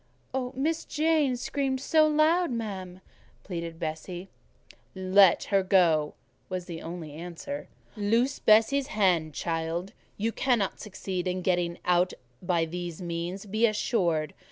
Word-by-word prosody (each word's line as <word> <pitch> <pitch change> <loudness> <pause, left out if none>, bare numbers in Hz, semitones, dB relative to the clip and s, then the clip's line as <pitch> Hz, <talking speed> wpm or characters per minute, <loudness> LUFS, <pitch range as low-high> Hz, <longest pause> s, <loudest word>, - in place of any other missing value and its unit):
"Miss 315 +5 0
Jane 305 -4 +1
screamed 265 +1 -1
so 310 +3 +4
loud, 315 +4 +3
ma'am," 190 -6 -5 0.4
pleaded 170 -3 -5
Bessie. 175 +4 -5 0.7
"Let 190 0 +5
her 195 - +5
go," 170 -6 +3 0.3
was 185 -1 -3
the 170 -2 -7
only 165 -3 -7
answer. 175 - -6 0.3
"Loose 230 +6 +1
Bessie's 225 +6 +4
hand, 175 - +1
child: 165 +2 -2 0.2
you 225 +3 0
cannot 235 -6 0
succeed 190 -3 -4
in 180 0 -2
getting 175 -2 +1
out 180 0 +3 0.3
by 175 -2 +1
these 175 0 -5
means, 175 +2 -4
be 215 +3 +2
assured. 170 - 0
185 Hz, 125 wpm, -28 LUFS, 170-235 Hz, 0.7 s, Let